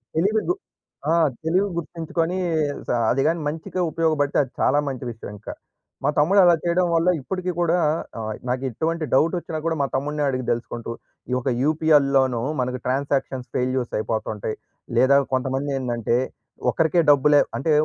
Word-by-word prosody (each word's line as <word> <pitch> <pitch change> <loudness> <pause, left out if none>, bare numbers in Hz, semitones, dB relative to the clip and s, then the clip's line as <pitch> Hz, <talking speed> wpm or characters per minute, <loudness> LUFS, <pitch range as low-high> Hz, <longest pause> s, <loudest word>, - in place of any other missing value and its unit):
తెలివి 205 +7 +2
గుర్ 365 - 0 0.5
ఆహ్, 165 -2 +4
తెలివి 180 +5 +2
గుర్తించుకొనీ 165 +1 -2 0.5
స - - -8 0.2
అదిగాని 155 +6 +1
మంచిగా 160 +4 -3
ఉపయోగబడితే 155 -3 +1
అది 130 - -11
చాలా 145 - +3
మంచి 130 -2 -4
విషయం 115 - -9
ఇంక. 105 - -17 0.6
మా 140 - +2
తమ్ముడు 185 +7 +4
అలా 175 -1 +6
చేయడం 175 +1 +2
వల్ల 165 +2 +3
ఇప్పడికి 185 +5 -3
కూడా 170 0 +2 0.4
ఆహ్, 110 -1 -3 0.2
నాకు 125 +1 -1
ఎట్టువంటి 160 +6 -2
డౌట్ 160 +7 +3
ఒచ్చినా 160 -2 -5
కూడా 165 -1 +1
మా 140 - +1
తమ్ముడినే 145 +2 -1
అడిగి 130 -1 -2
తెలుసుకుంటూ, 115 0 -4 0.4
ఈ - - -5
యొక్క 130 +1 -1
యూపీఐల్లోను 140 -5 +3 0.2
మనకు 125 0 -2
ట్రాన్సాక్షన్స్ 135 -1 -1
ఫెయిల్యూర్స్ 130 -1 -1
అయిపోతుంటాయి. 110 -1 -3 0.4
లేదా 135 +2 +5 0.2
కొంతమంది 135 +2 -1
ఏందంటే 120 -2 0 0.5
ఒకరికే 165 +1 +2
డబ్బులే 145 +1 +5 0.2
అంటే 155 +3 0
145 Hz, 150 wpm, -23 LUFS, 130-165 Hz, 0.6 s, అలా